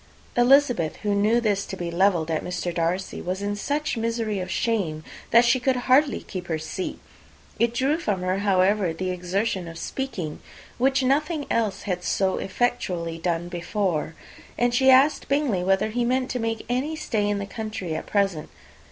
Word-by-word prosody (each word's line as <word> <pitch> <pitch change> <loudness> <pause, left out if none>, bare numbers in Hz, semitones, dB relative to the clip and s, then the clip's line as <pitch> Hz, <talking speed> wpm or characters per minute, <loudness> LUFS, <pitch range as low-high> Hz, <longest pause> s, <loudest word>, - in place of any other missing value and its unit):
Elizabeth, 245 - +4
who 205 -1 +1
knew 210 +4 +3
this 205 -4 +1
to 190 - -7
be 175 -1 -4
levelled 170 -2 +2
at 160 - -1
Mr. 180 -1 -3
Darcy, 175 +3 -1
was 185 +2 -3
in 205 0 -1
such 285 +5 -2
misery 225 -2 -1
of 185 0 -4
shame 185 -9 -1 0.3
that 235 +1 +6
she 235 +2 +4
could 260 +1 +1
hardly 260 +3 +3
keep 180 -3 -7
her 160 - -1
seat. 160 +4 -5 0.6
It 235 0 +3
drew 275 +6 +1
from 205 - -1
her, 185 +1 0
however, 195 -2 +2
the 185 +3 -3
exertion 180 +1 -2
of 165 0 -8
speaking, 180 - -4 0.4
which 265 +1 +3
nothing 295 +3 +1
else 220 -4 0
had 180 -3 -3
so 190 0 +1
effectually 180 -7 -1
done 170 0 -1
before; 175 -2 -2 0.4
and 240 0 +2
she 265 +2 +4
asked 270 +3 +5
Bingley 275 -10 +1
whether 195 +3 +2
he 240 +2 -1
meant 255 +2 0
to 250 - -2
make 225 -1 -2
any 260 +6 -1
stay 215 -9 -1
in 205 - 0
the 200 - -3
country 215 -5 -5
at 155 - -5
present. 195 -7 0
205 Hz, 180 wpm, -25 LUFS, 180-245 Hz, 0.6 s, that